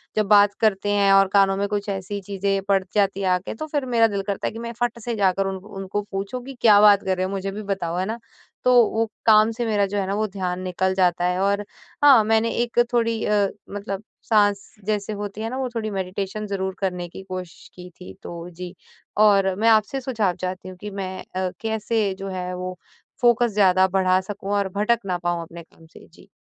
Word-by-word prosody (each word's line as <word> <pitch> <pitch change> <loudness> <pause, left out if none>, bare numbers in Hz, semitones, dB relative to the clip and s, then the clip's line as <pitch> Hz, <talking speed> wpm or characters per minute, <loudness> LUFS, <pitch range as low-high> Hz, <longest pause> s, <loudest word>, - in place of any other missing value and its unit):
जब 215 - +2
बात 205 0 +6
करते 205 -2 +2
हैं 200 -1 +3
और 195 0 +6
कानों 195 -1 +4
में 200 +1 0
कुछ 205 0 -3
ऐसी 195 +1 -4
चीज़ें 195 0 -1
पड़ 195 -1 +3
जाती 200 -1 +1
हैं 190 - 0
आ 180 - +3
के, 185 - -7
तो 310 +8 -6
फिर 290 -3 -2
मेरा 235 -3 +3
दिल 200 -2 -2
करता 200 -1 -2
है - - -2
कि 225 - -7
मैं 235 0 -5
फट 240 -1 -1
से 235 0 -2
जाकर 195 -1 +1
उन 195 - -3
उनको 195 -1 -4
पूछो 195 +5 -4
कि 270 +2 -9
क्या 210 -3 +7
बात 205 -1 +6
कर 190 -1 0
रहे 185 - 0
हो - - -3
मुझे 195 0 -3
भी 205 +2 -6
बताओ, 185 -4 -3
है 185 - 0
ना? 220 +3 -3 0.5
तो 250 - +4 0.2
वो 225 +1 0 0.2
काम 215 0 +6
से 235 +1 -3
मेरा 210 -3 +2
जो 205 - -3
है 195 - 0
ना 195 - -1
वो 215 +1 0
ध्यान 185 -2 -3
निकल 185 +1 -1
जाता 180 -2 +2
है 180 +1 0
और 200 +1 +1 0.4
हाँ, 270 -6 +8
मैंने 225 +1 +2
एक 240 0 -2
थोड़ी 230 -2 +1
अ, 205 -1 +2 0.2
मतलब 200 0 -5 0.2
साँस 205 -2 +1
जैसे 210 0 -1
होती 205 0 -6
है 225 - -3
ना, 255 - -4
वो 260 -1 -2
थोड़ी 220 -1 -2
मेडिटेशन 195 +2 -4
ज़रूर 190 -1 -3
करने 180 -2 -2
की 190 - -10
कोशिश 185 -2 -7
की 180 0 -10
थी। 180 - -10
तो 170 0 -7
जी। 180 +1 -8 0.4
और 200 -2 +4
मैं 220 +4 +2
आपसे 220 +4 +2
सुझाव 220 -8 -1
चाहती 185 0 -4
हूँ 185 - -11
कि 210 - -5
मैं 190 -2 -5
अ, 185 0 0
कैसे 220 -2 -1
जो 195 - -5
है 180 -1 -4
वो 180 0 -5 0.4
फोकस 240 -1 +4
ज़्यादा 190 -2 +4
बढ़ा 185 0 +2
सकूँ 200 +1 -6
और 200 -1 0
भटक 225 +3 +2
ना 180 -2 -1
पाऊँ 175 -1 -2
अपने 170 +1 -10
काम 165 0 -21
से? 160 - -16
जी। 175 - -20
200 Hz, 230 wpm, -23 LUFS, 185-215 Hz, 0.5 s, हाँ